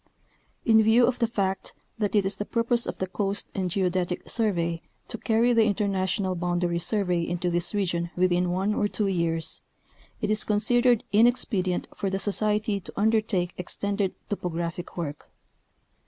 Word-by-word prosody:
In 220 Hz, -2 st, +6 dB
view 225 Hz, +3 st, +5 dB
of 250 Hz, 0 st, -1 dB
the 235 Hz, -, +2 dB
fact 195 Hz, -4 st, -2 dB, 0.2 s
that 205 Hz, -1 st, 0 dB
it 205 Hz, -2 st, +3 dB
is 195 Hz, -, -1 dB
the -, -, -2 dB
purpose 230 Hz, +2 st, 0 dB
of -, -, -4 dB
the 190 Hz, -, -1 dB
Ooast 195 Hz, +2 st, 0 dB
and 185 Hz, -2 st, -2 dB
Geodetic 180 Hz, -1 st, -1 dB
Survey 170 Hz, -7 st, +1 dB, 0.3 s
to 230 Hz, -, -4 dB
carry 235 Hz, +2 st, +2 dB
the 225 Hz, -2 st, +4 dB
international 195 Hz, -2 st, 0 dB
boundary 175 Hz, -1 st, -1 dB
survey 180 Hz, -2 st, +1 dB
into 175 Hz, +1 st, -2 dB
this 175 Hz, +3 st, 0 dB
region 170 Hz, -4 st, -1 dB
within 180 Hz, 0 st, +2 dB
one 190 Hz, +4 st, 0 dB
or 205 Hz, -, +1 dB
two 210 Hz, 0 st, -2 dB
years, 170 Hz, -4 st, -1 dB, 0.6 s
it -, -, -1 dB
is 215 Hz, -, +2 dB
considered 240 Hz, +3 st, +2 dB
inexpedient 210 Hz, -5 st, +2 dB
for 195 Hz, -, -2 dB
the 195 Hz, -, -1 dB
Society 210 Hz, +1 st, +2 dB
to 185 Hz, -, -11 dB
undertake 210 Hz, -4 st, +1 dB
extended 200 Hz, +2 st, -2 dB
topographic 175 Hz, -3 st, -4 dB
work. 150 Hz, -4 st, -5 dB
195 Hz, 155 wpm, -26 LUFS, 175-215 Hz, 0.6 s, In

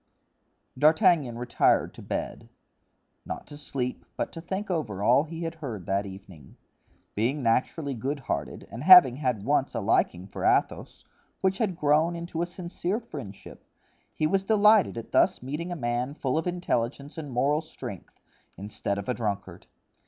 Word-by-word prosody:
D'Artagnan 155 Hz, -, +4 dB
retired 120 Hz, 0 st, +2 dB
to -, -, -12 dB
bed—not -, -, -8 dB
to 145 Hz, -, -11 dB
sleep, 135 Hz, -4 st, -4 dB
but -, -, -2 dB
to 165 Hz, -, -8 dB
think 190 Hz, +3 st, -4 dB
over 110 Hz, -, -2 dB
all 125 Hz, +7 st, +4 dB
he 165 Hz, +1 st, -6 dB
had 165 Hz, 0 st, -3 dB
heard 125 Hz, -, -7 dB
that 100 Hz, +1 st, -1 dB
evening. 95 Hz, -7 st, -13 dB, 0.6 s
Being 125 Hz, +7 st, -1 dB
naturally 130 Hz, +5 st, 0 dB
goodhearted, 135 Hz, +4 st, -4 dB
and 115 Hz, +4 st, -6 dB
having 165 Hz, -8 st, +9 dB
had 125 Hz, -8 st, -1 dB
once 140 Hz, -1 st, +1 dB
a -, -, 0 dB
liking 95 Hz, -4 st, +1 dB
for 95 Hz, -, -7 dB
Athos, -, -, 0 dB, 0.4 s
which 190 Hz, 0 st, +1 dB
had 200 Hz, -7 st, 0 dB
grown 155 Hz, +2 st, +2 dB
into 170 Hz, -1 st, -4 dB
a 170 Hz, -, -1 dB
sincere 180 Hz, +3 st, -3 dB
friendship, 140 Hz, -, -10 dB, 0.5 s
he 155 Hz, -, 0 dB
was 190 Hz, +5 st, +1 dB
delighted 210 Hz, -, +4 dB
at 115 Hz, -, -7 dB
thus -, -, +3 dB
meeting 150 Hz, +7 st, -4 dB
a -, -, -2 dB
man 125 Hz, 0 st, -2 dB
full 130 Hz, -4 st, -1 dB
of 160 Hz, +2 st, -1 dB
intelligence 140 Hz, -6 st, -2 dB
and 150 Hz, -3 st, -7 dB
moral 140 Hz, +5 st, +1 dB
strength, -, -, -9 dB, 0.4 s
instead 100 Hz, +1 st, -4 dB
of 100 Hz, -, -5 dB
a 125 Hz, -, +1 dB
drunkard. 100 Hz, -6 st, -4 dB
140 Hz, 155 wpm, -27 LUFS, 115-170 Hz, 0.6 s, having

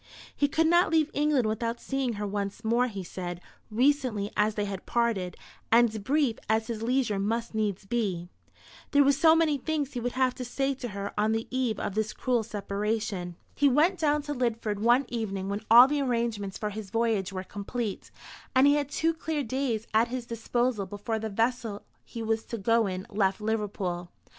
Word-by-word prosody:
He 285 Hz, -, +2 dB
could 320 Hz, +3 st, +1 dB
not 345 Hz, +2 st, +4 dB
leave 315 Hz, -1 st, +2 dB
England 290 Hz, -4 st, +2 dB
without 230 Hz, +2 st, -1 dB
seeing 270 Hz, -3 st, -2 dB
her 210 Hz, 0 st, -4 dB
once 205 Hz, +2 st, -4 dB
more, 235 Hz, +3 st, +3 dB
he 200 Hz, -5 st, -6 dB
said, 175 Hz, 0 st, -6 dB, 0.3 s
recently 245 Hz, -4 st, +1 dB
as 210 Hz, 0 st, +2 dB
they 205 Hz, -, -1 dB
had 195 Hz, -2 st, -6 dB
parted, 220 Hz, -7 st, 0 dB, 0.3 s
and 225 Hz, -2 st, +4 dB
brief 275 Hz, -1 st, +1 dB
as 220 Hz, 0 st, +2 dB
his 220 Hz, -1 st, -5 dB
leisure 235 Hz, -3 st, +1 dB
must 230 Hz, +4 st, -1 dB
needs 210 Hz, -3 st, -1 dB
be. 195 Hz, -6 st, -1 dB, 0.6 s
There 285 Hz, 0 st, +5 dB
were 280 Hz, -, +5 dB
so 320 Hz, +3 st, +5 dB
many 315 Hz, -3 st, +2 dB
things 295 Hz, -1 st, -2 dB
he 245 Hz, -, -2 dB
would 245 Hz, +1 st, -2 dB
have 255 Hz, -1 st, +2 dB
to 255 Hz, -, -6 dB
say 270 Hz, +3 st, -1 dB
to 255 Hz, -2 st, -6 dB
her 200 Hz, -2 st, -5 dB
on 215 Hz, +1 st, +2 dB
the 225 Hz, 0 st, -2 dB
eve 250 Hz, -4 st, 0 dB
of -, -, -3 dB
this 215 Hz, +1 st, -1 dB
cruel 250 Hz, -3 st, 0 dB
separation. 205 Hz, -3 st, -3 dB, 0.2 s
He 285 Hz, -1 st, +3 dB
went 320 Hz, +7 st, +3 dB
down 300 Hz, -2 st, +2 dB
to 295 Hz, 0 st, -3 dB
Lidford 230 Hz, -5 st, -1 dB
one 240 Hz, +5 st, +4 dB
evening 195 Hz, -5 st, -3 dB
when 200 Hz, +1 st, -2 dB
all 240 Hz, +3 st, +10 dB
the 290 Hz, 0 st, 0 dB
arrangements 230 Hz, -6 st, -1 dB
for 210 Hz, -1 st, -3 dB
his 210 Hz, -1 st, -7 dB
voyage 220 Hz, -3 st, 0 dB
were 185 Hz, -1 st, -4 dB
complete, 205 Hz, +2 st, -5 dB, 0.5 s
and 260 Hz, +1 st, +6 dB
he 285 Hz, -, +6 dB
had 290 Hz, -1 st, 0 dB
two 325 Hz, +3 st, +1 dB
clear 320 Hz, -2 st, -2 dB
days 240 Hz, -3 st, -2 dB
at 225 Hz, +2 st, +4 dB
his 250 Hz, 0 st, -4 dB
disposal 230 Hz, -2 st, -1 dB
before 205 Hz, +3 st, -3 dB
the 220 Hz, 0 st, -3 dB
vessel 225 Hz, 0 st, -1 dB, 0.2 s
he 230 Hz, -2 st, -7 dB
was 225 Hz, 0 st, 0 dB
to 230 Hz, -, -5 dB
go 230 Hz, +1 st, +2 dB
in 185 Hz, 0 st, -4 dB
left 195 Hz, -1 st, +1 dB
Liverpool. 205 Hz, -5 st, -2 dB
230 Hz, 195 wpm, -28 LUFS, 205-260 Hz, 0.6 s, all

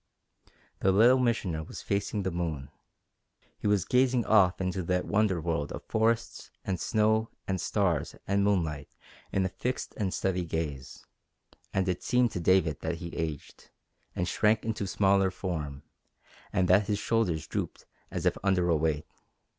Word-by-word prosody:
The 95 Hz, -, +3 dB
Little 120 Hz, +7 st, +6 dB
Missioner 105 Hz, -10 st, 0 dB
was -, -, -9 dB
facing 100 Hz, +1 st, -1 dB
the 95 Hz, -, -1 dB
moon. 80 Hz, -5 st, -3 dB, 0.9 s
He -, -, -2 dB
was 105 Hz, -4 st, +2 dB
gazing 125 Hz, -1 st, +2 dB
off 95 Hz, -5 st, +4 dB
into 95 Hz, 0 st, -1 dB
that 90 Hz, +1 st, 0 dB
wonder 100 Hz, -4 st, +2 dB
world 80 Hz, -3 st, -2 dB
of -, -, -6 dB
forests 115 Hz, +1 st, 0 dB, 0.2 s
and 95 Hz, -3 st, -1 dB
snow 110 Hz, +2 st, +2 dB, 0.2 s
and 95 Hz, -3 st, -1 dB
stars 90 Hz, -8 st, 0 dB
and 100 Hz, 0 st, +1 dB
moonlight 80 Hz, -8 st, 0 dB, 0.4 s
in 95 Hz, -1 st, +1 dB
a -, -, 0 dB
fixed 125 Hz, +6 st, -4 dB
and 100 Hz, -5 st, -1 dB
steady 95 Hz, -1 st, -1 dB
gaze, 80 Hz, -5 st, -5 dB, 0.7 s
and 95 Hz, -1 st, 0 dB
it 90 Hz, -1 st, -1 dB
seemed 125 Hz, -2 st, +2 dB
to -, -, -3 dB
David 85 Hz, -3 st, +3 dB
that 80 Hz, +1 st, -2 dB
he 85 Hz, 0 st, -7 dB
aged, 80 Hz, -4 st, -5 dB, 0.5 s
and 90 Hz, -, -1 dB
shrank 110 Hz, +2 st, +2 dB
into 110 Hz, -3 st, -2 dB
smaller 95 Hz, 0 st, +3 dB
form, 80 Hz, -7 st, -4 dB, 0.7 s
and 90 Hz, -, +2 dB
that 95 Hz, +2 st, +4 dB
his 105 Hz, -, +1 dB
shoulders 100 Hz, -8 st, 0 dB
drooped -, -, -4 dB, 0.2 s
as -, -, -4 dB
if -, -, +3 dB
under 90 Hz, -3 st, +2 dB
a 85 Hz, -, +4 dB
weight. 80 Hz, -1 st, 0 dB
95 Hz, 160 wpm, -29 LUFS, 85-105 Hz, 0.9 s, Little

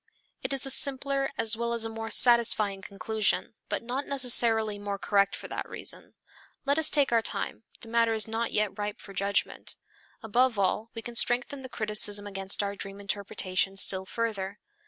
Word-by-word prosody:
It -, -, -4 dB
is 275 Hz, -1 st, +1 dB
a 270 Hz, -, +3 dB
simpler 275 Hz, 0 st, +2 dB
as 225 Hz, 0 st, +2 dB
well 235 Hz, +1 st, -2 dB
as 230 Hz, -1 st, -1 dB
a -, -, -1 dB
more 225 Hz, 0 st, -6 dB
satisfying 220 Hz, -5 st, +4 dB
conclusion, 210 Hz, +3 st, -1 dB, 0.2 s
but -, -, -2 dB
not 255 Hz, +4 st, -4 dB
necessarily 230 Hz, -5 st, +3 dB
more 200 Hz, -1 st, -4 dB
correct 200 Hz, 0 st, +1 dB
for -, -, -9 dB
that -, -, -5 dB
reason. -, -, -4 dB, 0.5 s
Let 280 Hz, +2 st, +2 dB
us 310 Hz, -1 st, +4 dB
take 285 Hz, -4 st, +2 dB
our 230 Hz, -1 st, +3 dB
time, 225 Hz, -, -4 dB, 0.2 s
the 230 Hz, -, -11 dB
matter 230 Hz, 0 st, +2 dB
is 220 Hz, -1 st, +2 dB
not 225 Hz, +1 st, -2 dB
yet 210 Hz, -1 st, -1 dB
ripe 205 Hz, 0 st, -4 dB
for 195 Hz, -, -12 dB
judgment. 200 Hz, +1 st, -1 dB, 0.5 s
Above 235 Hz, +2 st, +2 dB
all 200 Hz, +3 st, 0 dB
we 225 Hz, -, -5 dB
can 240 Hz, -, -8 dB
strengthen 240 Hz, +3 st, +2 dB
the 260 Hz, -, -9 dB
criticism 210 Hz, -2 st, +2 dB
against 195 Hz, 0 st, -1 dB
our 200 Hz, 0 st, -3 dB
dream 195 Hz, 0 st, -6 dB
interpretation 195 Hz, -1 st, -1 dB
still 190 Hz, -1 st, +2 dB
further. 205 Hz, -4 st, -3 dB
220 Hz, 180 wpm, -28 LUFS, 200-240 Hz, 0.5 s, satisfying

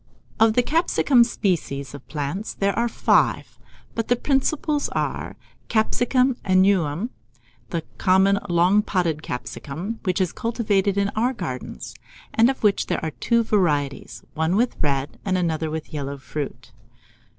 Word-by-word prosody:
Of 225 Hz, 0 st, +5 dB
the 245 Hz, -, +4 dB
capiscum 290 Hz, -4 st, +3 dB
species 160 Hz, -, -2 dB
of 140 Hz, -2 st, -11 dB
plants 155 Hz, +8 st, -4 dB
there 200 Hz, 0 st, +1 dB
are 235 Hz, +1 st, +1 dB
five; -, -, +1 dB, 0.3 s
but 230 Hz, -, -2 dB
the 245 Hz, -, +3 dB
principal 290 Hz, +3 st, 0 dB
are, -, -, -1 dB
1. -, -, -10 dB, 0.3 s
Capsicum 245 Hz, +3 st, +2 dB
annuum, 185 Hz, -, +2 dB, 0.6 s
the 165 Hz, -2 st, -2 dB, 0.2 s
common 190 Hz, +2 st, +4 dB
long 180 Hz, +4 st, +4 dB
podded 175 Hz, -7 st, -1 dB
capsicum, 155 Hz, -, -5 dB
which 185 Hz, -2 st, -1 dB
is 185 Hz, -3 st, +1 dB
cultivated 205 Hz, -4 st, 0 dB
in 200 Hz, 0 st, +2 dB
our 235 Hz, +5 st, 0 dB
gardens, 145 Hz, -, -6 dB, 0.4 s
and 230 Hz, +2 st, +5 dB
of 265 Hz, -, -3 dB
which 205 Hz, -2 st, +2 dB
there -, -, -2 dB
are 160 Hz, -, -2 dB
two 235 Hz, +9 st, +1 dB
varieties, 150 Hz, -10 st, 0 dB
one 160 Hz, +3 st, 0 dB
with 240 Hz, +4 st, +1 dB
red, 140 Hz, -1 st, -1 dB
and 190 Hz, -2 st, 0 dB
another 160 Hz, -3 st, -1 dB
with 160 Hz, 0 st, -6 dB
yellow 140 Hz, -1 st, -4 dB
fruit. 130 Hz, -2 st, -6 dB
190 Hz, 145 wpm, -23 LUFS, 155-230 Hz, 0.6 s, Of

